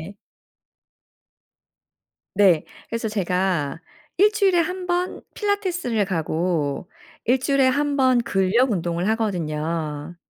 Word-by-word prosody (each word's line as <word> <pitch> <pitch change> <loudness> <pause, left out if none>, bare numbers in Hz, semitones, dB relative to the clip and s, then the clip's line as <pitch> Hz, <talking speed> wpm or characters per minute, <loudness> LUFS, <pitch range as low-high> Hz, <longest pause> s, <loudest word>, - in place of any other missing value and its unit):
그게 - - -45 2.2
네. 190 -6 +4 0.2
그래서 230 -1 -2
제가 180 -7 -1 0.4
1 410 +3 +5
주일에 395 -4 +3
1 365 +2 -2
번 355 +1 -1
필라테스를 355 - -1
가고 165 -3 -1 0.4
1 250 +3 +3
주일에 270 0 +2
1 285 +2 +1
번 255 -2 +4
근력 230 +3 +2
운동을 175 -1 -1
하거든요. 165 -6 -2
210 Hz, 185 characters per minute, -23 LUFS, 170-280 Hz, 2.2 s, 1